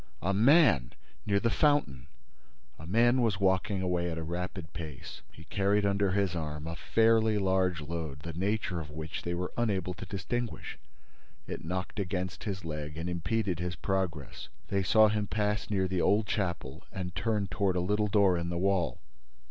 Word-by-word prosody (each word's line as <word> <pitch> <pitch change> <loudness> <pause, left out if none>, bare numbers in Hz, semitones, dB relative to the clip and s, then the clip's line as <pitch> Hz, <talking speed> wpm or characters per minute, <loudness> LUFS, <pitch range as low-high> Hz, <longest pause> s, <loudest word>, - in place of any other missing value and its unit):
—A 95 +3 +1
man!—Near 100 - +3
the 115 +2 +1
fountain!" 90 - +2 0.7
A 80 - -9
man 120 +6 +4
was 110 -4 +1
walking 95 0 +1
away 90 -1 0
at 80 - -4
a 80 - -3
rapid 90 +1 -5
pace. 80 -6 -7
He 80 - -13
carried 100 +4 +1
under 100 0 +2
his 100 -3 +1
arm 75 -2 -4
a 85 0 -4
fairly 110 +2 +3
large 95 -4 +1
load, 75 -2 -5
the 85 +2 -6
nature 95 0 -1
of 75 -2 -7
which 80 +1 -5
they 85 0 -2
were 90 +1 -3
unable 95 -6 0
to 90 +2 -8
distinguish: 110 +5 -4 0.7
it - - -6
knocked 90 +5 -4
against 90 -2 -3
his 95 -4 -4
leg 75 -1 -5
and 80 +2 -3
impeded 90 +1 -1
his 90 0 -2
progress. 90 -12 -3 0.2
They 100 - +1
saw 110 +3 +6
him 105 -1 0
pass 105 +1 -1
near 95 -3 +1
the 90 -1 0
old 105 +2 +3
chapel 85 - -2
and 90 -2 -5
turn 110 -2 0
toward 95 -1 0
a - - +2
little 105 +4 +1
door 100 -3 +4
in 85 0 -3
the 85 - -2
wall. 95 -1 +1
95 Hz, 175 wpm, -30 LUFS, 85-105 Hz, 0.7 s, saw